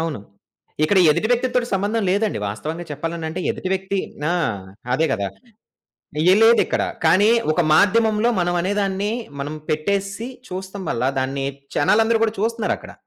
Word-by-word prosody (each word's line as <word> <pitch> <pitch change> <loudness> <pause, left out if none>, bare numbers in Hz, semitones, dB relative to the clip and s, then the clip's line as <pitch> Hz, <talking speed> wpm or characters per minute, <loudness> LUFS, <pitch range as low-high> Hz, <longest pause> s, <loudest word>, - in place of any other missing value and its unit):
అవును. 160 -9 -3 0.6
ఇక్కడ 195 +4 +3
ఎదుటి 220 +9 +1
వ్యక్తి 245 +1 +2
తోటి 245 -1 +2
సంబంధం 205 +3 0
లేదండి. 205 +2 0
వాస్తవంగా 155 +11 -5
చెప్పాలనంటే, 165 +3 -4
ఎదుటి 185 - -4
వ్యక్తి 190 +1 -2 0.3
ఆ! - - +2 0.6
అదే 160 +5 +2
గదా! 100 -2 -1 1.0
ఏ - - +7
లేదిక్కడ. 230 +1 +4 0.2
కానీ 190 +7 +5 0.2
ఒక 175 - +2
మాధ్యమంలో 215 +5 +3
మనం 175 0 0
అనేదాన్ని, 200 +1 -1 0.3
మనం 150 +2 -4
పెట్టేసి, 200 +8 -1 0.2
చూస్తం 190 +1 -6
వల్ల 115 - -1 0.2
దాన్ని 135 +1 -2 0.3
జనాలందరూ 225 +8 +3
గూడా 220 -1 0
చూస్తున్నారక్కడ. 225 0 -2
190 Hz, 135 wpm, -21 LUFS, 160-215 Hz, 1.0 s, ఏ